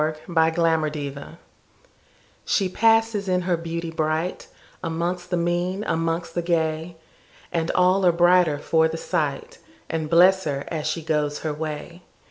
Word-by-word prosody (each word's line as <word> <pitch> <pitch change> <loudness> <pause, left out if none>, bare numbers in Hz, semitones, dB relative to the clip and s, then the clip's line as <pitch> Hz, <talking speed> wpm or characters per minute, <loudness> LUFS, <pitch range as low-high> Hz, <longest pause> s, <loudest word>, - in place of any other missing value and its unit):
1840 160 -1 0
The 140 +1 -9
Secret 165 - -14 1.1
SHE 195 -3 +1
passes 225 -1 +2
in 180 0 +2
her 180 -1 +1
beauty 165 0 -5
brightAmongst 165 +2 -3
the 175 - 0
mean, 175 +3 -1
amongst 165 -1 -2
the 175 - -1
gay, 165 0 -1 0.5
And 165 -1 -1
all 185 +2 +3
are - - +6
brighter 175 -2 +4
for 160 +2 +2
the 160 0 -5
sight, 150 -5 -3 0.3
And 160 -1 -2
bless 185 +3 +5
her 140 -2 -2
as 155 -2 -3
she 155 +1 -2
goes 150 -2 -1
her 155 -2 -2
way. 155 +3 -6
165 Hz, 140 wpm, -23 LUFS, 155-180 Hz, 1.1 s, are